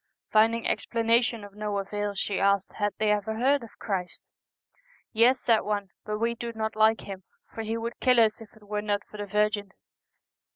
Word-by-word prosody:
Finding 225 +2 +3
explanation 230 -1 +1
of 200 -1 -11
no 210 0 -3
avail, 205 +1 -3
she 195 0 -1
asked 200 0 +2
had 205 -1 0
they 215 -1 +2
ever 210 +1 0
heard 270 +5 +2
of 230 -1 -12
Christ? 185 -4 -4 0.5
' - - -36 0.3
Yes,' 245 +3 +5
said 225 -2 +4
one; 205 -2 -2
' - - -61
but 210 0 -1
we 230 +2 0
do 235 0 -5
not 220 -1 -2
like 220 +1 +4
Him, 195 -1 -8 0.3
for 225 - -4
He 220 +1 -2
would 230 +1 -5
kill 250 -2 +4
us 220 -1 +3
if 220 - -12
it 215 - -19
were 210 0 -3
not 205 -1 -1
for 210 - -12
the 205 0 -5
Virgin.' 210 0 +1
215 Hz, 205 wpm, -27 LUFS, 205-230 Hz, 0.5 s, Yes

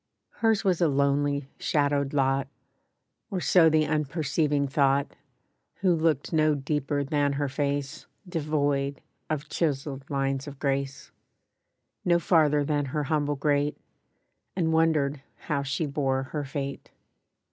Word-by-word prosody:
HERS 225 -2 +2
was 185 -3 +1
a 170 - +5
lonely, 140 0 +1
shadowed 145 -2 +1
lot; 135 -1 +1 0.8
Or 195 -4 -2
so 175 -2 +5
the 155 -1 +3
unperceiving 150 -1 0
thought, 140 0 +1 0.7
Who 185 -2 +4
looked 160 -2 0
no 155 -1 +3
deeper 145 0 -1
than 145 0 +1
her 145 +1 -1
face, 140 +1 -3 0.2
Devoid 145 -4 -1 0.3
of 155 -1 -2
chiseled 140 -3 -2
lines 135 0 -1
of 140 -1 -8
grace— 135 -1 -2 0.9
No 175 -1 +4
farther 150 -4 +3
than 145 -1 0
her 145 +3 -2
humble 145 0 0
grate, 145 0 0 0.8
And 165 -3 +1
wondered 150 -4 +2
how 140 -3 -2
she 140 +4 -2
bore 135 -2 0
her 150 -2 -2
fate. 140 0 -5
145 Hz, 125 wpm, -27 LUFS, 140-155 Hz, 0.9 s, a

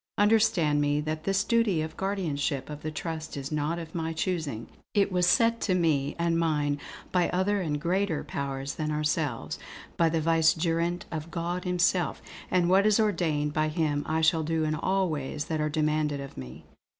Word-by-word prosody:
Understand 205 -8 +3
me 145 0 +1
that 155 +1 -4
this 195 0 +2
duty 220 -9 +2
of 160 - -6
guardianship 155 -8 -2
of 150 0 -7
the 155 - -3
trust 160 0 -5
is 135 +1 -5
not 150 +2 -1
of 165 -2 -7
my 165 -1 -2
choosing. 160 - -2 0.3
It 200 -1 +3
was 180 -1 +2
set 230 +4 +3
to 185 - +1
me 155 -6 +1
and 170 0 +1
mine 150 -3 +1 0.3
by 180 -1 +2
other 195 +2 +1
and 150 -4 -1
greater 180 0 0
powers 135 0 -4
than 155 -1 -3
ourselves, 150 -4 -1 0.4
by 165 -1 +4
the 165 0 0
Vicegerent 165 +2 +2
of 160 0 -5
God 175 +2 -3
Himself; 180 -2 +1 0.3
and 180 -2 +2
what 195 +3 +5
is 215 +1 +4
ordained 160 -8 +1
by 155 0 +1
him 155 -2 0
I 160 +1 0
shall 160 0 +3
do 160 0 0
in 155 0 0
all 190 +4 +1
ways 150 -2 -3
that 155 -1 -2
are 155 - 0
demanded 150 -1 0
of 140 -1 -8
me." 65 +4 -9
160 Hz, 185 wpm, -28 LUFS, 150-180 Hz, 0.4 s, what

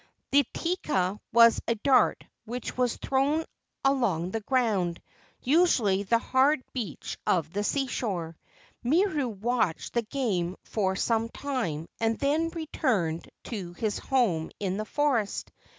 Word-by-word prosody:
The 280 -2 +4
teka 210 - -1
was 230 0 +6
a 230 - +2
dart 255 +4 +3 0.2
which 240 +2 -5
was 250 -2 +1
thrown 285 +4 +1 0.4
along 210 -11 +1
the 225 - -1
ground, 210 -8 0 0.4
usually 255 - +3
the 215 +4 +2
hard 260 +3 +2
beach 220 - -5
of 165 -3 +1
the 205 +1 -1
seashore. 205 - -2 0.5
Miru 305 +1 +2
watched 220 -4 -1
the 235 - +2
game 210 -8 -1
for 190 -3 -1
some 225 +2 0
time 230 - -3
and 225 -1 +1
then 305 +4 +1
returned 250 - -1
to 190 -7 -6
his 210 +3 -2
home 210 -12 +1
in 195 -1 -1
the 215 - -3
forest. 255 -7 0
230 Hz, 130 wpm, -28 LUFS, 190-270 Hz, 0.5 s, was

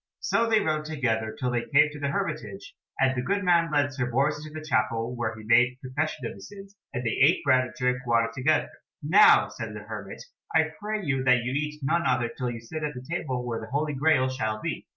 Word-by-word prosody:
So 230 0 +1
they 220 -1 +4
rode 155 -3 -1
together 115 -8 -1
till 125 -1 -1
they 120 -1 0
came 150 +2 +5
to 150 - -9
the 140 - -1
hermitage, 140 -9 -4 0.3
and 130 0 +3
the 125 - -1
good 200 +10 -1
man 170 -3 +3
led 145 -1 +1
Sir 130 -2 -2
Bors 145 +4 0
into 155 0 -8
the 155 - -11
chapel, 115 -3 0
where 115 -2 -3
he 110 - -10
made 125 +2 +4
confession 130 +1 -3
of - - -4
his 100 - -12
sins, 200 0 -12 0.2
and 125 -2 -4
they 115 - -1
ate 160 +6 +5
bread 130 -2 +4
and 130 - -10
drank 125 0 -1
water 115 -1 +2
together. 135 +5 +1 0.3
"Now," 190 +8 +6
said - - -7
the - - -7
hermit, - - -8 0.3
"I 160 0 +3
pray 210 -1 -3
you 135 -3 0
that 125 -2 +4
you 125 - -2
eat 150 +2 -3
none 155 +2 +1
other 120 -2 +1
till 125 -2 -2
you 115 -1 -6
sit 155 +7 -7
at 150 -1 -3
the 125 0 -8
table 130 -6 -3
where 115 -2 -3
the 110 - -8
Holy 150 +4 -1
Graal 140 -2 +3
shall 110 -5 -2
be." - - -5
135 Hz, 235 wpm, -26 LUFS, 120-155 Hz, 0.3 s, Now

